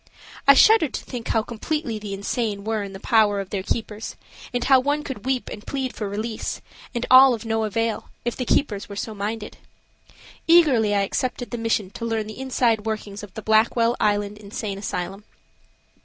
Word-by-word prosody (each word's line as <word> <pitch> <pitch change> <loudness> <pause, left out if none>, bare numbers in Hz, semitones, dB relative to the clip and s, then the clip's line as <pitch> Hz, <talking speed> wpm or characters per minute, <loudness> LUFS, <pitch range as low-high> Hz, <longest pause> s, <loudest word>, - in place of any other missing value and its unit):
I 280 - +9
shuddered 430 - +5
to - - -4
think 240 -2 -6
how 225 - +1
completely 235 0 -3
the 205 -2 -5
insane 200 0 -2
were 220 0 -1
in 200 -1 -6
the 195 - -8
power 210 -1 +3
of 195 -2 -6
their 200 - -1
keepers, 215 +2 -4 0.4
and 245 -2 -1
how 265 -1 +6
one 290 +3 0
could 255 -6 -7
weep 260 -1 0
and 210 - -9
plead 265 -2 -2
for 210 -2 -4
release, 215 +2 -4 0.4
and 240 - -1
all 260 -1 +9
of 225 - -10
no 225 -1 0
avail, 225 +1 -2 0.2
if 240 - -1
the 255 - -3
keepers 215 -5 0
were 200 - -7
so 220 +2 -4
minded. 210 +1 -5 0.9
Eagerly 270 -12 +5
I 200 - +3
accepted 245 +5 -2
the 240 - -3
mission 220 -4 0
to 230 - -6
learn 225 -2 -1
the 215 +3 -9
inside 245 -4 +1
workings 210 -2 -4
of 205 -3 -11
the 220 - -6
Blackwell 230 +2 +3
Island 205 0 0
Insane 200 -1 -5
Asylum. 195 0 -4
220 Hz, 190 wpm, -23 LUFS, 205-245 Hz, 0.9 s, I